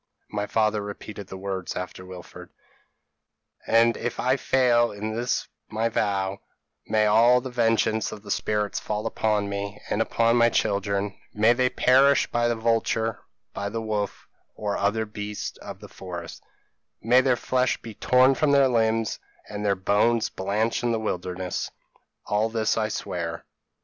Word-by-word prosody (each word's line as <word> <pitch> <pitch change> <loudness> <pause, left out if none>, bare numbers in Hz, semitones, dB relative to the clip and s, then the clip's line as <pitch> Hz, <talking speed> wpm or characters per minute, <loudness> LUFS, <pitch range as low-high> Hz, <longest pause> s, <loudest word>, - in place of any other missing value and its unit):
p> - - -9
"My 105 0 -1
father 110 -1 +1
repeated 100 -1 -8
the 95 - -8
words 95 -1 -4
after 90 0 -6
Wilfred. 90 -1 -11 1.2
"'And 115 +1 +4
if - - -4
I 130 +1 +2
fail 125 -3 +3
in 110 +2 -4
this 120 +2 -1 0.2
my 110 +2 0
vow, 100 -3 -1 0.5
may 110 0 +2
all 115 +4 +5
the 130 +1 -7
vengeance 115 -2 +1
of 110 -1 -9
the 100 - -6
spirits 105 0 -1
fall 105 0 -3
upon 105 -2 0
me 100 +1 -4
and 105 - +1
upon 115 +1 +2
my 120 0 +5
children; 100 -2 0 0.2
may 110 +3 +5
they 125 +1 +2
perish 135 +3 +4
by 120 0 +2
the 120 - +1
vulture, 115 0 0 0.3
by 100 0 -3
the 115 +2 -3
wolf, 105 -2 -3 0.3
or 105 -1 -2
other 110 +2 0
beasts 105 -1 -6
of - - -9
the - - -10
forest; 90 -2 -8 0.6
may 125 +3 +5
their 130 -1 +3
flesh 125 +1 0
be 115 - -9
torn 130 +5 +4
from 145 +2 +2
their 140 -1 +6
limbs, 115 -3 +1 0.3
and 105 0 -5
their 100 -1 +2
bones 105 +4 +2
blanch 105 +4 -1
in 120 - 0
the 115 - 0
wilderness: 90 -3 -3 0.6
all 105 +2 +1
this 110 -1 0
I 110 -1 0
swear.' 85 -5 -4
110 Hz, 160 wpm, -25 LUFS, 100-115 Hz, 1.2 s, their